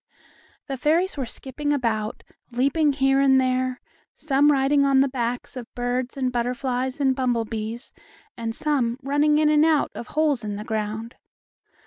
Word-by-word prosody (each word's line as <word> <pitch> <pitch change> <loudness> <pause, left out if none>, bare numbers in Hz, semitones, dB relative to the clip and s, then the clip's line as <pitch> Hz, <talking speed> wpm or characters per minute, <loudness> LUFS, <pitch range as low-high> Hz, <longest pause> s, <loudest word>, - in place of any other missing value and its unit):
The 270 -2 -4
fairies 330 +8 +1
were 270 -4 -3
skipping 290 +5 -4
about, 225 -6 -1 0.3
leaping 280 +5 +2
here 270 0 +2
and 265 -1 +5
there, 255 0 0 0.4
some 290 0 +3
riding 280 +1 +3
on 275 -1 +4
the 275 - +4
backs 245 -2 -3
of 245 -2 -8
birds 245 +1 -2
and 255 -2 0
butterflies 250 +2 -2
and 265 -2 +2
bumblebees, 230 -2 -2 0.4
and 225 -1 -4
some 255 -6 0
running 290 +2 +2
in 305 0 +3
and 300 0 +4
out 315 -2 +2
of 240 - -7
holes 295 -6 +1
in 205 -1 -4
the 210 - -5
ground. 220 +1 -4
260 Hz, 155 wpm, -24 LUFS, 240-285 Hz, 0.4 s, and